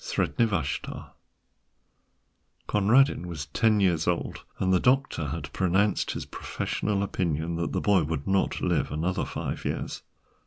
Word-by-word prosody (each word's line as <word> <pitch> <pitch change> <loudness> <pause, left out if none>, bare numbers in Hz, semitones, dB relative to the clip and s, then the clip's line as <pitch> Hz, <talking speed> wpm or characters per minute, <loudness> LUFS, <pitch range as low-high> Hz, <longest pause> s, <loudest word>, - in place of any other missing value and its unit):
SREDNI 120 - +1
VASHTAR 80 -10 -3 1.6
Conradin 110 0 +3
was 80 -5 -5
ten 110 +7 +2
years 85 -5 +2
old, 90 -1 -1
and 95 0 +1
the 90 - +5
doctor 125 - +2
had 70 0 -5
pronounced 95 +3 +2
his - - -5
professional 100 -2 -2
opinion 85 -4 -1
that 85 - -2
the - - -1
boy 100 -3 +4
would 75 -2 -3
not 95 0 +1
live - - +1
another 85 +5 -1
five - - -4
years. - - -3
90 Hz, 140 wpm, -27 LUFS, 80-105 Hz, 1.6 s, the